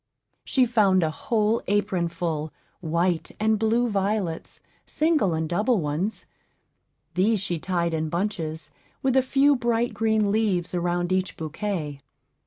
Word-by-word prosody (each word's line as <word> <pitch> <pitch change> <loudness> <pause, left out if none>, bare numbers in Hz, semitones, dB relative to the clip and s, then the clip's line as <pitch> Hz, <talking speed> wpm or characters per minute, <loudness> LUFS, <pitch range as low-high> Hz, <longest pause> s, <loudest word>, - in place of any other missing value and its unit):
She 260 -2 +2
found 205 -6 +3
a 155 - +1
whole 220 +6 0
apron 195 -4 +1
full, 165 -2 -3 0.3
white 170 +1 -1
and 215 0 +2
blue 230 +2 +2
violets, 200 -5 -2 0.2
single 300 - +1
and 160 0 -1
double 210 +7 +1
ones; 160 +7 -2 0.9
these 205 +4 +2
she 180 -3 -2
tied 170 -1 -1
in 160 -1 -1
bunches, 170 -3 -3 0.3
with 265 -1 +2
a 265 - +6
few 275 +2 +3
bright 235 -1 0
green 220 -2 +1
leaves 200 -6 0
around 175 0 -1
each 185 -2 -1
bouquet. 160 -2 -4
190 Hz, 135 wpm, -25 LUFS, 170-220 Hz, 0.9 s, a